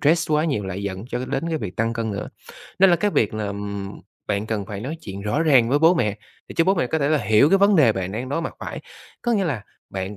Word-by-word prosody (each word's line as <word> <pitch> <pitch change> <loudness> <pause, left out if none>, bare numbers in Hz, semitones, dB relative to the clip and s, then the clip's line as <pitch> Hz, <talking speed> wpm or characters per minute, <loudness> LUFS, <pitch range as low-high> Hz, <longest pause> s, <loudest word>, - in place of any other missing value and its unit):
stress 160 +2 +2
quá 150 +1 +3
nhiều 135 -11 -1
lại 95 +1 -4
dẫn 100 0 -4
cho 125 -1 -3
đến 140 +5 -2
cái 160 -2 -1
việc 100 -5 -6
tăng 115 +1 0
cân 115 -1 -2
nữa. 100 - -4 0.5
Nên 190 0 +7
là 175 - +5
cái 205 +2 0
việc 110 - +1
là, 105 -1 -2
ừm, 100 -1 -5 0.3
bạn 100 +2 -1
cần 105 -3 -3
phải 105 -2 -6
nói 140 +9 -4
chuyện 100 -1 -7
rõ 125 +10 0
ràng 135 -8 +5
với 140 +4 +3
bố 165 +3 +5
mẹ 105 - 0 0.3
để - - -9
cho 165 - +4
bố 190 +2 +3
mẹ 165 -8 0
có 160 - -1
thể 140 0 +1
là 155 - +3
hiểu 110 +3 +4
cái 195 - +4
vấn 200 0 +5
đề 135 -9 +5
bạn 95 -1 -4
đang 125 +4 -4
đối 145 +5 -1
mặt - - -5
phải, - - -6 0.4
có 240 - +1
nghĩa 200 -4 +2
là 135 - -2 0.3
bạn 95 +1 -4
120 Hz, 285 wpm, -23 LUFS, 100-160 Hz, 0.5 s, Nên